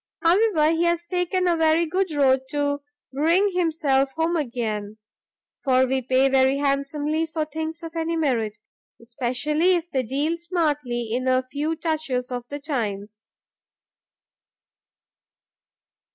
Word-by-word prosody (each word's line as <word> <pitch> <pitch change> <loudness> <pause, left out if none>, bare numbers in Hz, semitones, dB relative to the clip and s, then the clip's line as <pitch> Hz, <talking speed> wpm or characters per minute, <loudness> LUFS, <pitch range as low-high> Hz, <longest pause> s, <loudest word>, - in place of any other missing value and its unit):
However, 335 -3 +4
he 330 +1 +1
has 340 0 +1
taken 360 +1 0
a 345 - +3
very 325 +1 +3
good 365 +2 -1
road 265 -3 +2
to 285 0 -1 0.3
bring 335 +8 +3
himself 305 -6 +1
home 325 +1 0
again, 220 -7 -3 0.7
for 260 -2 +4
we 260 +1 0
pay 260 +2 +3
very 265 0 +3
handsomely 290 +3 0
for 315 -1 -2
things 320 +2 -5
of 330 0 -8
any 330 0 -1
merit, 235 -9 0 0.4
especially 255 +9 0
if 345 0 -4
they 265 - +1
deal 285 +7 -1
smartly 295 -9 -1
in 255 +2 -1
a 255 0 +2
few 300 +3 -1
touches 305 -6 -2
of 245 -1 -5
the 285 - -4
times." 220 -7 -4
295 Hz, 130 wpm, -24 LUFS, 260-330 Hz, 0.7 s, However